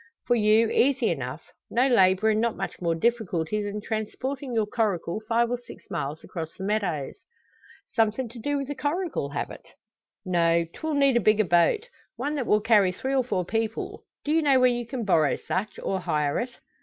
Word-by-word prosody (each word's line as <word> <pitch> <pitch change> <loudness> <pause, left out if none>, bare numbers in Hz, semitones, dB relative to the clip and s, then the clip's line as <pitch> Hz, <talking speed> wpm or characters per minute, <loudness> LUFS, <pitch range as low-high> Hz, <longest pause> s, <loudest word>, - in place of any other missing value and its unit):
"For 245 - +2
you, 220 0 +4
easy 260 -2 +3
enough. 135 -1 -4 0.3
No 245 +3 +2
labour 195 -3 +4
and 215 0 +1
not 235 -1 0
much 195 - -5
more 170 -2 +1
difficulty 210 -2 0
than 205 0 -4
transporting 255 +6 -4
your 225 -2 +1
coracle 210 -4 -1
five 235 +1 +2
or 245 - -1
six 245 - -14
miles 145 +2 -3
across 165 -3 -6
the 190 - -6
meadows." 190 -9 -1 0.8
"Somethin' 225 +2 +1
to 235 +1 -11
do 290 +5 -1
wi' 275 - -2
the 290 - -4
coracle, 295 - -2
have 145 - -3
it?" - - -12 0.6
"No; 170 -2 +2
'twill 315 -1 -3
need 275 -3 +4
a - - +2
bigger 215 +1 +4
boat 175 - +3 0.3
one 280 +5 -2
that 275 -5 -2
will 210 - +4
carry 210 -4 +4
three 265 +9 -3
or 265 -1 +3
four 185 -7 -1
people. 225 +2 -3 0.2
Do 295 - 0
you 325 +1 +4
know 275 -4 +4
where 255 0 +5
you 240 -1 -3
can 240 -2 -4
borrow 160 -7 +3
such, 200 +4 -3
or 190 - -2
hire 150 -4 0
it?" 245 0 -5
220 Hz, 195 wpm, -26 LUFS, 185-250 Hz, 0.8 s, where